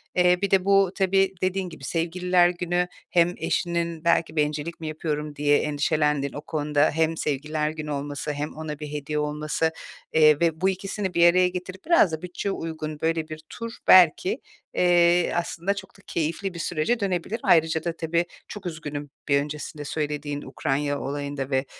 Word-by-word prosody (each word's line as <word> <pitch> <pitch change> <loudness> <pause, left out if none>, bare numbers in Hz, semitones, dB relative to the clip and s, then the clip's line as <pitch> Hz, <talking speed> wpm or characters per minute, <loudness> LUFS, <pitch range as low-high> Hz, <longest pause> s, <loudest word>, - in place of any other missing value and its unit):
Eee, 180 0 +4
bir 200 - 0
de 190 -1 +3
bu 195 -2 +4
tabii 195 0 +2
dediğin 185 0 -1
gibi 160 -4 -12
Sevgililer 175 +3 +2
Günü 175 0 -1 0.2
hem 175 0 +3
eşinin 170 -2 -1
belki 165 -1 +2
"Bencillik 150 +2 -1
mi 160 - -5
yapıyorum?" 150 -1 -3
diye 145 0 +3
endişelendiğin 150 -1 0
o 145 - -6
konuda 150 -1 +1
hem 160 +1 +1
Sevgililer 150 +1 -1
Günü 155 -1 -5
olması 145 +1 -3
hem 145 +1 -4
ona 155 -2 -6
bir 150 -1 -6
hediye 150 +1 -2
olması, 150 +2 -1 0.4
eee, 155 -2 +6
ve 165 0 +1
bu 190 - +4
ikisini 190 0 -3
bir 170 0 +6
araya 185 0 +4
getirip 185 +1 -7
biraz 335 - +5
da 160 - -4
bütçeye 180 +2 -3
uygun 155 -4 -5
böyle 160 -1 0
bir 155 0 -7
tur 230 0 -6 0.2
belki, 185 - +6 0.3
eee, 175 -1 +4
aslında 175 +2 -1
çok 200 -1 -10
da - - -19
keyifli 170 +4 -2
bir 170 - -7
sürece 175 +9 0
dönebilir. 195 +3 -2
Ayrıca 160 -1 +3
da 170 -1 -3
tabii 170 +1 0 0.2
çok 205 - -9
üzgünüm 150 -4 -5 0.2
bir 140 -1 +4
öncesinde 150 0 -6
söylediğin 145 -1 -3
Ukrayna 145 +1 -1
olayında 140 -1 -4
ve, 130 0 +1
160 Hz, 170 wpm, -25 LUFS, 150-180 Hz, 0.4 s, eee